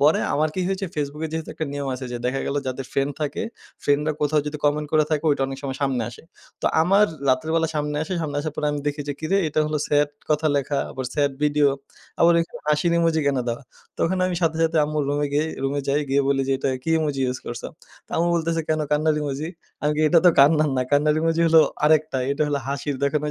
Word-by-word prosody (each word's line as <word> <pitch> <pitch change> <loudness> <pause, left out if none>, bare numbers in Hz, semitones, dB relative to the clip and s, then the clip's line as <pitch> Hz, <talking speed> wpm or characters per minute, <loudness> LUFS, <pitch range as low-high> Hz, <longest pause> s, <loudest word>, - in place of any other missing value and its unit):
পরে 150 +3 +4
আমার 155 +2 +2
কি 185 - -1
হয়েছে 195 0 -2
Facebook 150 0 -3
এ - - -8
যেহেতু 160 -1 -4
একটা 155 - -3
নিয়ম 140 -1 -3
আছে 130 +1 -6
যে, - - -2
দেখা 130 +2 -1
গেলো 145 - 0
যাদের 130 +1 -3
ফ্রেন্ড 140 +1 0
থাকে 145 -2 -2 0.8
কোথাও 150 +1 +2
যদি 150 +1 -3
কমেন্ট 150 +1 +1
করে 155 -1 +4
থাকে 155 0 0
ওইটা 140 -2 +1
অনেক 135 0 -6
সময় 135 -2 -4
সামনে 135 -3 0
আসে। - - -13 0.4
তো - - +1 0.2
আমার 195 +5 +5 0.2
রাত্রে 130 +4 +2
বেলা 165 -1 +2
সামনে 150 0 -1
আসে। 160 - -5
সামনে 145 -2 -3
আসার 155 0 -4
পর - - -3
আমি 145 - -3
দেখি 145 0 -1
যে, - - 0
কিরে 160 +5 +1
এটা 155 - 0
হলো 155 0 -1
স্যাড 145 0 +2 0.2
কথা 155 +1 +2
লেখা, 140 0 0
আবার 130 - -5
স্যাড 145 -2 +1
ভিডিও, 150 -1 +3 0.5
আবার 170 +1 +6
ওইখানে 165 - -3
হাসির 150 +3 +2
ইমোজি 165 -1 +2
কেন 140 -2 +2
দেওয়া? 120 +4 -3 0.4
তখন 185 +3 +1
আমি 185 - -2
সাথে, 160 -1 +2
সাথে 160 0 +1
আম্মুর 150 0 -1
রুমে 145 +1 0
গিয়ে 150 +2 +1 0.2
রুমে 140 +1 0
যাই 145 +2 +2
গিয়ে 140 +1 +3
বলি 135 -1 +2
যে, 135 - +3
"এটা - - -1
কি 165 - -2
ইমোজি 145 -3 -1
ইউজ 125 0 -2
করছো?" 120 0 -5 0.4
তো - - -35
আম্মু 170 +1 +2
বলতেছে 165 0 0
"কেন 155 0 +1
কান্নার 150 +1 +2
ইমোজি?" 145 +2 -3 0.3
আমি 150 0 +2
কি - - +1
"এটা 170 - +6
তো - - +9
কান্নার 150 +1 +5
না। 130 - +2
কান্নার 150 +1 +3
ইমোজি 165 0 +1
হলো 160 0 +7 0.2
আরেকটা। 155 -2 +3
এটা 140 +2 0
হল 145 - 0
হাসির 140 0 -3
দেখনা 145 +1 +1
ঐযে - - -1
150 Hz, 235 wpm, -23 LUFS, 140-160 Hz, 0.8 s, তো